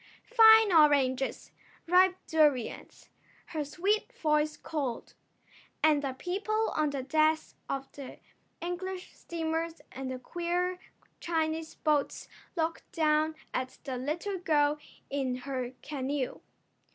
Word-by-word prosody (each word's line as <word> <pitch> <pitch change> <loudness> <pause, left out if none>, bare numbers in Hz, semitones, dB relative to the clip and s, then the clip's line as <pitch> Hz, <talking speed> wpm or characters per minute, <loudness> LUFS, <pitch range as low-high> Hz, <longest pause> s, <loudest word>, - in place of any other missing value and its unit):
"Fine 445 -3 +7
oranges! 275 -4 +3 0.3
Ripe 365 +2 +5
durions!" 295 -7 0 0.4
her 310 -2 -1
sweet 395 - 0
voice 300 -4 +1
called. 275 -7 -4 0.7
And 305 -2 +5
the 275 -2 -2
people 405 +9 -1
on 305 -1 +2
the 275 -2 -3
decks 310 +3 +2 0.2
of 270 0 -3
the 275 -2 -9 0.4
English 360 +2 -5
steamers 325 0 -3
and 265 0 -5
the 260 - -4
queer 350 +6 -2 0.4
Chinese 320 -1 -2
boats 300 -3 0 0.3
looked 330 -1 -2
down 310 -2 +2 0.2
at 255 0 -3
the 265 -2 -4
little 335 +10 -3
girl 300 -3 +2 0.3
in 270 -3 -1
her 255 -2 -3
canoe. 275 -2 -3
310 Hz, 115 wpm, -30 LUFS, 275-345 Hz, 0.7 s, Fine